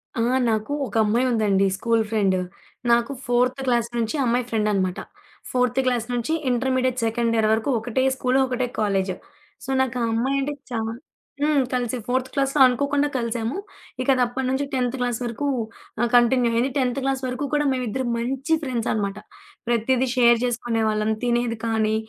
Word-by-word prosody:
ఆ! 230 - 0 0.3
నాకు 220 +5 -1
ఒక - - -11
అమ్మాయుందండి. 215 -4 +2
School 230 0 +1
friend. 195 -4 +2 0.5
నాకు 235 +3 +3
ఫోర్త్ 250 +2 +1
క్లాస్ 235 -1 +2
నుంచి 230 +5 -1
ఆ - - +2
అమ్మాయి 240 +1 +1
ఫ్రెండనమాట. 205 -4 0 0.5
ఫోర్త్ 250 0 +1
క్లాస్ 245 -3 +1
నుంచి 240 +6 -1 0.2
ఇంటర్మీడియేట్ 255 0 0
సెకండ్ 230 0 0
ఇయర్ 220 -1 +3
వరకు 220 +5 0
ఒకటే 245 +3 -1
స్కూలు, 260 +1 +1
ఒకటే 250 0 -1
కాలేజి. 195 -3 0 0.5
సో, - - -9
నాకా 255 -1 -1
అమ్మాయంటే 275 +4 0 0.2
చా 230 - -1 0.6
హ్మ్. 295 -2 +3
కలిసి 250 -1 -1
ఫోర్త్ 255 +1 -1
క్లాస్‌లో 275 0 0
అనుకోకుండా 285 +3 +1
కలిసాము. 235 - -2 0.4
ఇకది 255 -1 +2
అప్పడి 250 +2 -2
నుంచి 270 +2 0
10థ్ 255 -1 0
క్లాస్ 245 -1 -1
వరకు 240 +5 -3 0.5
ఆహ్, 240 - +2
కంటిన్యూ 240 0 +4
అయింది. 240 +4 +2
10థ్ 250 -1 0
క్లాస్ 270 0 0
వరకు 255 +3 -3
కూడా 295 0 +2
మేమిు 255 -1 -1
ఇద్దర 260 +5 -2
మంచి 270 +6 -1
ఫ్రెండ్సనమాట. 220 -6 -2 0.5
ప్రతీదీ 245 +2 +1
షేర్ 235 -2 +5
జేసుకునేవాళ్ళం. 225 -3 0
తినేది 240 -1 0
కానీ 220 -1 +1
245 Hz, 150 wpm, -23 LUFS, 225-260 Hz, 0.6 s, షేర్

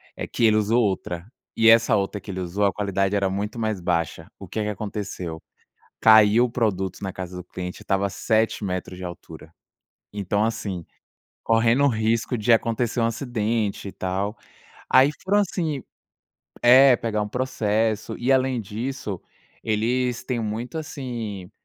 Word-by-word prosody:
eh, - - -5
que 115 - +1
ele 110 -1 +5
usou 110 +3 +3
outra 95 -4 -2 0.3
e 115 0 +5
essa 115 0 +6
outra 100 0 -1
que 100 - -13
ele 95 - -5
usou 95 +3 -1
a 100 - +3
qualidade 100 -1 0
era 100 -1 +1
muito 105 +4 -3
mais 110 -3 -1
baixa. 85 -1 -1
O - - -9
que 110 - -4
é - - 0
que 105 - -2
aconteceu? 95 -5 -5 0.6
Caiu 110 +1 +7
o - - -8
produto 100 -6 -1
na 95 -1 -3
casa 90 -1 -7
do 90 - -7
cliente, 90 0 -7
estava 95 0 0
a - - -4
7 110 +1 0
metros 90 -1 -4
de 95 - -7
altura. 80 -2 -10 0.6
Então 100 +1 0
assim, 95 -6 -3 0.6
correndo 115 +4 +3
o - - +5
risco 115 +1 0
de 115 +3 +3
acontecer 115 +1 +1
um - - +2
acidente 115 -4 -2
e - - -8
tal. 95 +4 -3 0.6
Aí 130 +2 +7
foram 205 +2 +3
assim 165 -8 -1 0.8
É, 130 +2 +8
pegar 110 -2 -2
um 105 - -3
processo. 110 -3 -1
E 125 +3 0
além 130 -2 +2
disso, 105 -2 -5 0.4
eles 120 +3 0
têm 125 -2 -2
muito, 115 +6 -4
assim, 120 - -6
110 Hz, 165 wpm, -24 LUFS, 95-120 Hz, 0.8 s, É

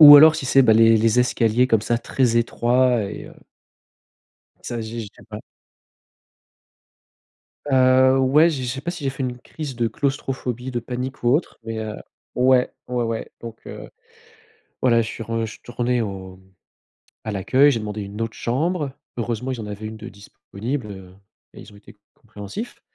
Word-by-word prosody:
ou 145 -1 +13
alors 155 +2 +8
si 135 - -4
c'est 135 +1 +5
bah, 115 -3 +5
les 115 0 +6
les 115 +2 +3
escaliers 125 0 +2
comme 115 -4 +3
ça 120 +1 0
très 120 0 0
étroits 120 +1 +2
et 100 - -7
heu - - -13 1.3
ça 120 - -4
j'ai 115 +1 -5
j'ai 110 - -7 0.2
pas 105 - -7 2.3
Heu, 130 0 +5
ouais, 145 +6 +5
je 140 -5 -4
je 125 - -3
sais 130 +2 -4
pas 170 - -2
si 175 -4 -7
j'ai 135 - +1
fait 135 - -6
une 125 -1 -3
crise 145 +2 -7
de 115 -1 0
claustrophobie, 130 -2 -3
de 120 -2 -2
panique 125 +3 -5
ou 120 - +2
autre, 160 - -2
mais, 115 0 -4
heu 110 -1 -5 0.4
ouais, 125 0 +3 0.2
ouais 125 -1 -1
ouais. 115 -1 -4
Donc 115 -1 -9
heu, - - -8 0.9
voilà, 115 -2 +4
je 110 - -5
suis - - -6
retourné 120 +2 -2
au 95 -3 -7 0.8
à 110 - -4
l'accueil, 130 +9 +4
j'ai 120 - -1
demandé 105 -1 -5
une 100 +2 -7
autre 115 -1 -3
chambre, 150 +4 -1 0.3
heureusement, 120 +2 -3
ils 125 - -4
en 105 - -7
avaient 105 +1 -7
une 110 +1 -6
de 110 +2 -9
disponible, 105 +3 -6
heu 95 -2 -11 0.4
et - - -13
ils - - -13
ont - - -16
été 100 0 -17 0.2
compréhensifs. 110 - -8
120 Hz, 175 wpm, -22 LUFS, 110-130 Hz, 2.3 s, ou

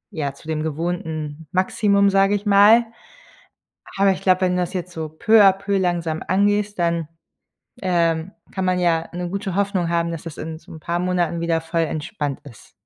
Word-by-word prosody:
ja, 145 -4 -2
zu 155 - -17
dem 155 -1 -2
gewohnten 160 -1 -4
Maximum, 200 +2 +2
sage 195 +1 +3
ich 205 +1 -4
mal. 210 +3 +6 1.1
Aber 195 0 +4
ich 190 - -1
glaube, 185 -1 +3
wenn 180 -1 +2
du 180 - 0
das 175 - -4
jetzt 180 -1 -4
so 160 -2 -5
peu 215 +8 +3
a 195 - +7
peu 200 +1 -2
langsam 170 -4 -1
angehst, 205 +1 +1
dann, 170 -1 0 0.8
ähm, 170 -1 0 0.2
kann 190 -1 -3
man 185 0 +1
ja 165 -2 +1
'ne 175 0 -4
gute 195 0 -4
Hoffnung 195 -3 0
haben, 170 0 0
dass 165 -2 -6
das 165 -2 -8
in 160 0 -6
so - - -17
'n 160 - -10
paar 170 +2 -2
Monaten 175 -2 0
wieder 165 -1 0
voll 165 +1 -1
entspannt 150 -2 -4
ist. 120 -7 -15
175 Hz, 190 wpm, -21 LUFS, 160-195 Hz, 1.1 s, a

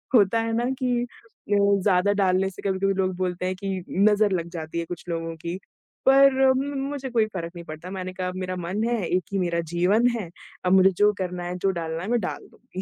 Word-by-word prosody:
होता 215 0 +5
है 225 0 -2
ना 240 +1 0
कि 250 -2 +1
अ, 230 -3 -6
ज़्यादा 200 -1 +3
डालने 190 0 +2
से 190 - -11
कभी-कभी 195 +1 +1
लोग 185 -1 0
बोलते 180 -1 -2
हैं 185 0 -1
कि 190 -1 -4
नज़र 210 +1 +3
लग 170 -3 -1
जाती 160 0 -4
है 170 - -2
कुछ 175 0 -7
लोगों 165 -1 -3
की, 170 +2 -2 0.5
पर 275 0 +7 0.2
म 280 +2 -2
मुझे 280 -2 -4
कोई 230 -3 +2
फ़र्क 170 -3 -4
नहीं 170 0 -8
पड़ता। 155 +3 -8
मैंने 185 -1 -5
कहा, 185 0 -3
"मेरा 185 0 -3
मन 180 +4 -3
है, 235 -1 0
1 180 0 +1
ही 195 - +1
मेरा 170 -2 0
जीवन 200 +7 +3
है। 195 -7 -5 0.4
अब 180 - +3
मुझे 190 0 +6
जो 210 0 +5
करना 180 -1 -3
है, 175 +1 -4
जो 195 +2 +1
डालना 165 0 -4
है 200 - -4
मैं 240 0 +2
डाल 180 - -5
दूँगी।" 185 - -9
190 Hz, 225 wpm, -25 LUFS, 180-210 Hz, 0.5 s, पर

